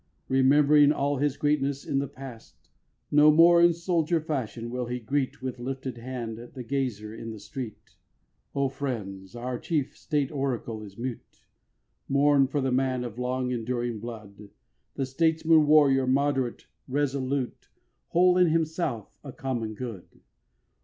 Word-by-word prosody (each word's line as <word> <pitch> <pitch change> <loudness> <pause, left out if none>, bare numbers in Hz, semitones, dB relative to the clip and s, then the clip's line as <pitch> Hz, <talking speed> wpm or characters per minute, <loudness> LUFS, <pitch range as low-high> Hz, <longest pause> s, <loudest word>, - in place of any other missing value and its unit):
Remembering 145 +2 +5
all 145 -1 0
his 145 +1 0
greatness 140 -2 0
in 135 - 0
the 140 - -2
Past. 135 -4 -12 0.4
No 150 +1 +7
more 170 +2 +7
in 170 0 +7
soldier 170 -1 0
fashion 125 -7 -4
will 125 -1 -3
he 125 +1 -3
greet 130 +2 -2
With 130 -2 -4
lifted 130 -1 -5
hand 115 -2 -5
the 120 +2 -9
gazer 120 -5 -3
in 115 0 -7
the 110 -1 -7
street. 110 +2 -8 0.6
O 140 -1 +2
friends, 110 -8 -5
our 120 +1 -4
chief 150 -5 -2
state 145 -3 -1
oracle 125 -6 -3
is 100 -2 -11
mute: 125 0 -7 0.6
Mourn 140 0 +4
for 140 +2 -1
the 130 0 0
man 130 -1 +1
of 120 -1 -7
long 125 0 -1
enduring 120 -1 -2
blood, 105 -3 -9 0.5
The 135 - -1
statesman 160 +2 +3
warrior, 140 -3 +5
moderate, 135 -2 0 0.2
resolute, 135 -1 -2 0.4
Whole 180 +1 +4
in 180 - +6
himself, 160 - -1
a 140 - -7
common 120 -7 -3
good. 115 -6 -7
130 Hz, 145 wpm, -27 LUFS, 120-145 Hz, 0.6 s, No